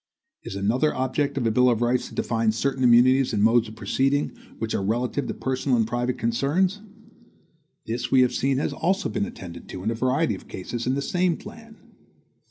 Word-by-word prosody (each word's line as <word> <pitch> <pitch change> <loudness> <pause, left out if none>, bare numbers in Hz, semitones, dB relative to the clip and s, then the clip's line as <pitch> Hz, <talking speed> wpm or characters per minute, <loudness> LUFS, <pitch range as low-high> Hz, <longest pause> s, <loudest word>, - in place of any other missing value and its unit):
Is - - -7
another 115 +10 +1
object 130 +3 -1
of 125 - 0
a 115 - +2
bill 125 +3 +4
of 120 -1 +1
rights 120 +1 0
to - - -12
define 115 -2 0
certain 135 +3 -1
immunities 125 +2 +5
and 105 -1 +1
modes 115 +1 +4
of 110 - -10
proceeding, 135 +5 0 0.3
which 110 0 -3
are - - 0
relative 120 +7 -1
to - - -3
personal 130 -1 0
and 115 - +2
private 120 +2 -2
concerns? 155 - 0 1.0
This 120 +2 -3
we 130 - +5
have 125 - +2
seen 135 0 +1
has 140 - -1
also 190 +4 0
been 205 - -2
attended 90 - -10
to, 90 - -7
in 110 - 0
a - - 0
variety 130 +3 +1
of 95 - -9
cases, 120 +6 -5
in 130 - +1
the 140 - -2
same 180 +1 +1
plan. 225 +1 -12
125 Hz, 200 wpm, -24 LUFS, 115-140 Hz, 1.0 s, immunities